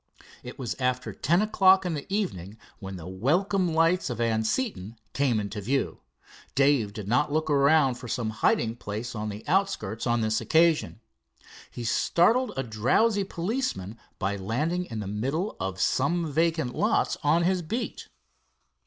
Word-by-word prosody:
It 125 - -9
was 120 -4 -3
after 125 0 -1
ten 170 +8 +2
o'clock 190 -3 +4
in 175 - -1
the 145 +4 -6
evening 110 - -3 0.2
when 95 -2 -7
the 90 -1 -8
welcome 175 - +1
lights 165 +1 +2
of 120 -2 -4
Anseton 115 - -1 0.2
came 130 -6 +1
into 105 0 -4
view. 135 +7 -1 0.6
Dave 135 -6 +3
did 105 -1 -7
not 125 +7 +2
look 155 +1 0
around 140 -2 +4
for 125 - -8
some 115 -1 -2
hiding 115 +1 +1
place 110 +2 -5
on 105 -1 -4
the 105 +4 -8
outskirts 155 - 0
on 120 0 +2
this 110 0 0
occasion. 160 -8 +2 0.7
He 120 - -7
startled 215 - +2
a 135 - 0
drowsy 135 - +2
policeman 180 - -3 0.2
by 100 0 -2
landing 150 - -1
in 115 -7 -5
the 100 - -5
middle 135 - -2
of 95 0 -4
some 160 - +1
vacant 160 -4 +1
lots 210 - +1
on 160 +3 +3
his 185 +1 +1
beat. 220 +10 -4
135 Hz, 155 wpm, -27 LUFS, 110-170 Hz, 0.7 s, o'clock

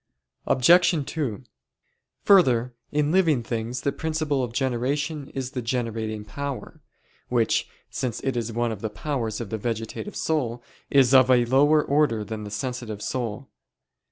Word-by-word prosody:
Obj. 170 +3 +4
2: 135 -6 -3 0.8
Further, 125 - +4 0.2
in 150 0 +1
living 160 -9 +3
things 115 +2 -3
the 140 - 0
principle 155 -3 -1
of 120 - -3
generation 135 +4 -1
is 130 -1 -3
the 125 - -3
generating 115 -3 -3
power; 140 +3 -6 0.5
which, 120 -3 +1 0.2
since 125 -4 -3
it 135 -2 -1
is 115 -1 -2
one 120 +1 -1
of 105 -3 -6
the 110 - -2
powers 115 0 -3
of 115 -5 -6
the 110 - -2
vegetative 115 - -4
soul, 125 -7 -1 0.3
is 135 -2 +4
of 130 -1 +7
a 125 -2 +5
lower 145 +5 +4
order 140 -7 +2
than 105 0 -6
the - - -6
sensitive 115 0 -4
soul. 125 0 -4
125 Hz, 150 wpm, -25 LUFS, 115-145 Hz, 0.8 s, of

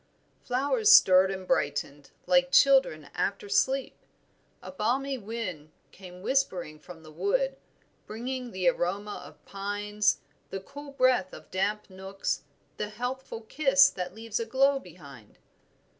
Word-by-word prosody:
Flowers 285 - +2
stirred 190 - +7
and 190 -1 -6
brightened 140 0 -1 0.2
like 270 0 +3
children 265 - +4
after 200 +1 -2
sleep. 265 +6 +1 0.7
A - - -8
balmy 270 +2 -1
wind 195 -9 -6 0.2
came 180 -1 -13
whispering 180 - -1
from 165 +1 -13
the 155 - -13
wood, - - 0 0.5
bringing 250 +3 -5
the 185 -4 -2
aroma 195 +5 -1
of - - -15
pines, 205 +1 -1 0.3
the 195 - -4
cool 285 +8 -11
breath 255 -8 +2
of - - -12
damp 205 +3 -1
nooks, 190 +1 -4 0.4
the 210 - -3
healthful 245 +1 -5
kiss 275 +4 +4
that 180 0 -6
leaves 225 0 -4
a 230 - -2
glow 270 +3 +3
behind. 140 - -14
210 Hz, 130 wpm, -28 LUFS, 185-265 Hz, 0.7 s, stirred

